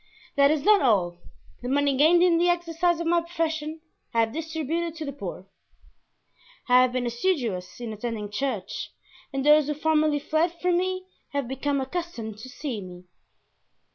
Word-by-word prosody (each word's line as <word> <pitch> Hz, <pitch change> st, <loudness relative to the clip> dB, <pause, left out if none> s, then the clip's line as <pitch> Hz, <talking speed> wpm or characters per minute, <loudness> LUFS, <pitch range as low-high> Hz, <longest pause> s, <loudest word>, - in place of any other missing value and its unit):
That 280 Hz, -1 st, +5 dB
is 300 Hz, -2 st, +1 dB
not 420 Hz, +2 st, +6 dB
all; 185 Hz, -9 st, +2 dB, 0.4 s
the 245 Hz, -, -4 dB
money 280 Hz, 0 st, +2 dB
gained 325 Hz, +6 st, +5 dB
in 340 Hz, -2 st, +4 dB
the 350 Hz, +1 st, +3 dB
exercise 345 Hz, 0 st, +1 dB
of 335 Hz, -, -2 dB
my 340 Hz, +1 st, +3 dB
profession 320 Hz, -2 st, -3 dB, 0.3 s
I 230 Hz, -, +5 dB
have 225 Hz, 0 st, 0 dB
distributed 320 Hz, +1 st, -3 dB
to 320 Hz, -2 st, -5 dB
the 280 Hz, -, -5 dB
poor; 190 Hz, -7 st, -7 dB, 1.2 s
I 250 Hz, 0 st, +6 dB
have 255 Hz, -1 st, +3 dB
been 255 Hz, -1 st, -1 dB
assiduous 240 Hz, -, -1 dB
in 235 Hz, -2 st, -5 dB
attending 215 Hz, -1 st, -4 dB
church 270 Hz, +5 st, -3 dB, 0.4 s
and 270 Hz, 0 st, -2 dB
those 300 Hz, -1 st, +6 dB
who 300 Hz, -, -1 dB
formerly 310 Hz, 0 st, +2 dB
fled 315 Hz, +4 st, 0 dB
from 360 Hz, -1 st, +2 dB
me 370 Hz, 0 st, -2 dB, 0.3 s
have 280 Hz, -3 st, -1 dB
become 275 Hz, +2 st, -1 dB
accustomed 265 Hz, -7 st, -5 dB
to 260 Hz, -, -9 dB
seeing 250 Hz, -8 st, -5 dB
me. 180 Hz, 0 st, -12 dB
290 Hz, 170 wpm, -26 LUFS, 245-335 Hz, 1.2 s, not